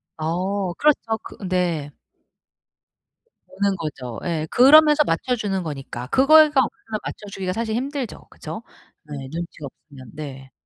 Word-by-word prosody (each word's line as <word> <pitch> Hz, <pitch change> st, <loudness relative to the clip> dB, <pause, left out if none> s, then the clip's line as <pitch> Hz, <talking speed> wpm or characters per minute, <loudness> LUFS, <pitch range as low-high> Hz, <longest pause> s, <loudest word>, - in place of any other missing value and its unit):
어 180 Hz, +4 st, -2 dB
그렇죠. 230 Hz, -3 st, +1 dB
그 -, -, -11 dB
네. 175 Hz, -5 st, -1 dB, 1.6 s
보는 200 Hz, 0 st, 0 dB
거죠. 135 Hz, -7 st, -6 dB
예 160 Hz, -3 st, -2 dB
그러면서 300 Hz, +3 st, +7 dB
맞춰 250 Hz, +8 st, 0 dB
주는 195 Hz, -5 st, -2 dB
거니까. 135 Hz, -5 st, -6 dB
그걸가 295 Hz, -, +6 dB
없으면 220 Hz, -2 st, -5 dB
맞춰 -, -, -7 dB
주기가 185 Hz, -2 st, -3 dB
사실 220 Hz, 0 st, -2 dB
힘들죠 265 Hz, 0 st, -4 dB
그죠? 220 Hz, -, -8 dB, 0.4 s
네 150 Hz, -, -11 dB, 0.2 s
눈치가 165 Hz, -3 st, -6 dB
없으면 130 Hz, -3 st, -15 dB
네. 135 Hz, -3 st, -8 dB
185 Hz, 270 characters per minute, -22 LUFS, 155-240 Hz, 1.6 s, 그러면서